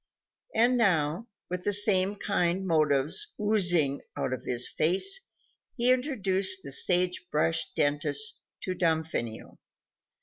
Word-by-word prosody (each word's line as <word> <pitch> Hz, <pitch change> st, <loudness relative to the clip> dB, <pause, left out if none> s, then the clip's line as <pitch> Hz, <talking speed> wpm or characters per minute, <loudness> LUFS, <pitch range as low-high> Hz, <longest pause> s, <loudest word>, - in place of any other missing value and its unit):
And 245 Hz, +2 st, +3 dB
now, 170 Hz, -1 st, 0 dB, 0.2 s
with 180 Hz, 0 st, -5 dB
the 205 Hz, -, 0 dB
same 200 Hz, -1 st, +3 dB
kind 190 Hz, -2 st, -1 dB
motives 155 Hz, -, +1 dB
oozing 175 Hz, -9 st, +2 dB, 0.2 s
out 130 Hz, -, -2 dB
of 130 Hz, -, -7 dB
his 125 Hz, 0 st, -1 dB
face, 380 Hz, -, 0 dB, 0.5 s
he 245 Hz, +1 st, +3 dB
introduced 195 Hz, -8 st, +1 dB
the 140 Hz, -, -8 dB
sage 180 Hz, +4 st, +1 dB
brush 165 Hz, +2 st, 0 dB
dentist 145 Hz, -, 0 dB, 0.2 s
to 185 Hz, -, -4 dB
Damfino. 160 Hz, -10 st, -3 dB
180 Hz, 115 wpm, -27 LUFS, 155-205 Hz, 0.5 s, And